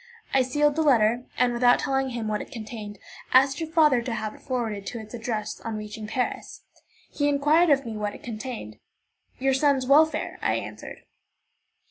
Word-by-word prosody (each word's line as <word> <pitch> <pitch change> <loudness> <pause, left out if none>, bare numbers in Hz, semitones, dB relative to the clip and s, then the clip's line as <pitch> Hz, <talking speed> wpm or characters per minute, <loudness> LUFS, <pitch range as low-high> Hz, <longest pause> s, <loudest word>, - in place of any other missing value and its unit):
I 270 - +5
sealed 290 +3 +1
the 320 - +1
letter, 240 -4 +3
and, 245 -1 +2
without 245 0 +4
telling 270 -1 -1
him 235 -3 -4
what 210 -1 -1
it - - -10
contained, 215 -4 -7 0.4
asked 270 +1 +5
your 325 -1 -4
father 305 -6 +4
to 235 0 -4
have 215 -1 -4
it - - -16
forwarded 225 -7 -3
to 235 - -5
its 215 0 -11
address 220 -2 -4
on 225 -1 -5
reaching 215 0 -7
Paris. 250 +3 -3 0.5
He 290 0 0
inquired 295 +4 +3
of 275 -2 +3
me 225 -2 -5
what 210 -1 -3
it - - -13
contained. 220 - -7 0.6
"Your 270 +1 +1
son's 270 -1 +2
welfare," 310 +4 +3
I - - +1
answered. - - -7
250 Hz, 180 wpm, -25 LUFS, 215-275 Hz, 0.6 s, I